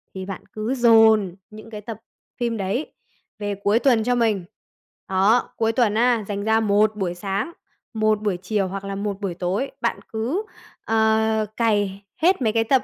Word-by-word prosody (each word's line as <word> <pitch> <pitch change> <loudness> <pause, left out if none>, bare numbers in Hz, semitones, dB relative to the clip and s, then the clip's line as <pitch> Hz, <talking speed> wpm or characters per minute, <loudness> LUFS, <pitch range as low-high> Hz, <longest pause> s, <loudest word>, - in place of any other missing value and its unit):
Thì 190 0 -5
bạn 195 -1 -7
cứ 215 +4 -2
dồn 220 -6 +5
những 215 +1 -12
cái 210 -2 -7
tập 220 +1 -7 0.4
phim 235 -2 -1
đấy 200 +9 -3 0.5
về 205 -1 -2
cuối 210 +3 +3
tuần 240 -4 +3
cho 245 +2 +1
mình. 220 -6 +1 0.6
Đó, 195 +6 +3
cuối 225 0 +2
tuần 225 -2 +2
á, 235 0 +2
dành 200 -1 -3
ra 220 +1 +3
một 215 0 +2
buổi 190 -4 -2
sáng, 195 - -3 0.4
một 215 -1 +1
buổi 205 -4 -1
chiều 195 +2 -1
hoặc 195 +1 -6
là 195 0 -4
một 200 0 -4
buổi 195 -3 -2
tối, 185 +10 -2
bạn 235 - 0
cứ, 245 - -1 0.4
ờ, 220 0 +2
cày 205 -4 0 0.2
hết 360 0 +3
mấy 220 -3 +1
cái 225 0 +3
tập 260 +3 +2
215 Hz, 180 wpm, -23 LUFS, 200-230 Hz, 0.6 s, dồn